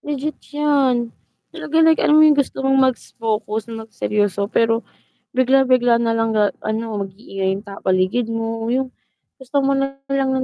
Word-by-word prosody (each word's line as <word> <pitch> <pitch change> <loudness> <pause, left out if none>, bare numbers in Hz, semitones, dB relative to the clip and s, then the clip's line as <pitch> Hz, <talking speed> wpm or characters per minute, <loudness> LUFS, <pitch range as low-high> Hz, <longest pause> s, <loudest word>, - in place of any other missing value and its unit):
Legit 295 +1 -4 0.2
yan, 265 -5 +1 0.4
talaga 315 - -5
like 320 0 +4
alam 300 - +4
mo 310 - +7
yung 300 -1 +5
gusto 270 -1 -1
mong 270 0 +3 0.2
mag-focus 220 -2 -4
na 225 -1 -6
mag 220 - -23
seryoso, 205 -1 -1
pero 225 +1 +1 0.5
bigla 260 +1 +3
bigla 245 -2 +3
nalang 225 -1 0
ga 210 -1 +3 0.2
ano, 220 -1 -3
mag-iingay 195 -1 -5
yung 200 - -8
tao 200 -2 -9
paligid 185 +6 +1
mo, 225 0 -3
yung 260 +2 -1 0.5
gusto 275 +2 -1
mo 275 - +2
nalang 275 0 -1
235 Hz, 160 wpm, -20 LUFS, 220-270 Hz, 0.5 s, mo